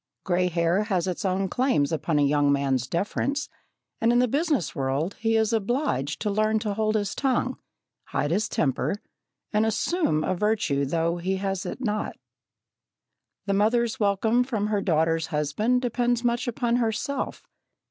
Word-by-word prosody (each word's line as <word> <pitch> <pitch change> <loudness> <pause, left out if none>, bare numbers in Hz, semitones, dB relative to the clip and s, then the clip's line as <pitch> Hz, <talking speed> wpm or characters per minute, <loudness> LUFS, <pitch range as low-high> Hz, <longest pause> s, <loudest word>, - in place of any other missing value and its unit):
Grey 180 0 +1
hair 170 +3 +1
has 185 -5 0
its 185 -2 -3
own 190 0 0
claims 180 - +1
upon 160 0 0
a 145 - +4
young 145 0 +3
man's 135 -3 +1
deference, 275 - -1 0.5
and, 230 +1 +4
in 240 - +3
the 250 +1 +4
business 285 - 0
world, 140 +7 -1
he 225 0 +1
is 220 +1 +2
obliged 220 - 0
to 210 - -1
learn 215 +1 +2
to 215 -1 -2
hold 215 +1 0
his 205 -2 0
tongue, 260 -1 0 0.5
hide 145 - -1
his 210 +5 +1
temper, 140 +6 0 0.6
and 210 +1 +3
"assume 220 - +1
a - - 0
virtue 185 -8 +1
though 165 +4 0
he 185 +2 -1
has 195 0 -2
it 215 - -6
not." 215 -3 -2 1.3
The 200 - 0
mother's 225 +3 +2
welcome 220 +4 +2
from 220 -5 -2
her 205 -2 +1
daughter's 165 -2 +1
husband 165 - 0
depends 240 0 0
much 240 +1 0
upon 240 0 0
herself. 235 +4 -2
205 Hz, 160 wpm, -26 LUFS, 165-235 Hz, 1.3 s, a